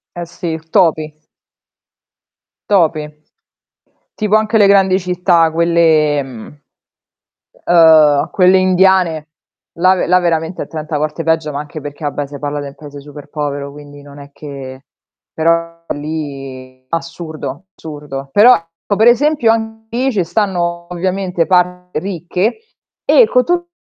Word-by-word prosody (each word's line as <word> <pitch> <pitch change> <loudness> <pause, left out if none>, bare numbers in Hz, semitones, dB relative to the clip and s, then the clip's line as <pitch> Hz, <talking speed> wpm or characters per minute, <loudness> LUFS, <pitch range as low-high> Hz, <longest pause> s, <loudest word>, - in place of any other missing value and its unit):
Eh 175 0 -5
sì, 170 -1 -5
topi. 155 -3 +2 1.6
Topi. 155 -6 +1 1.1
Tipo 215 -1 +1
anche 215 +1 +2
le 205 -2 +5
grandi 195 -1 +4
città, 180 -2 +2
quelle, 165 -3 +2
ehm 135 +1 -9 1.1
uhm, 160 -4 +5
quelle 185 0 +4
indiane, 185 -4 +2 0.5
là 185 +2 +4
ve 185 - -1
là 180 +2 +4
veramente 170 0 -1
è - - -7
30 155 -1 -4
volte 155 +2 -3
peggio, 160 -1 0
ma 140 - -4
anche 150 +1 -8
perché 145 +2 -8
vabbè 145 0 -3
se 140 0 -10
parla 145 0 -3
den 140 -1 -8
paese 145 -2 -11
super 145 0 -12
povero, 145 -1 -4
quindi 145 0 -13
non 140 0 -14
è 140 0 -12
che 135 -2 -9 0.5
però 165 +1 -1
lì 135 -4 -6
assurdo, 165 +2 -6
assurdo. 145 -3 -8
Però, 235 +5 +7
ecco 165 +4 -4
per 220 +3 +3
esempio 275 -1 +3
anche 220 0 -4
lì 260 +2 +1
ce 195 -6 0
stanno 175 -3 -2
ovviamente 180 -1 -2
parti 180 -1 0
ricche 185 - -2 0.5
e - - +5
con 250 0 +2
tutto 350 0 -1
165 Hz, 135 wpm, -15 LUFS, 150-185 Hz, 1.6 s, Però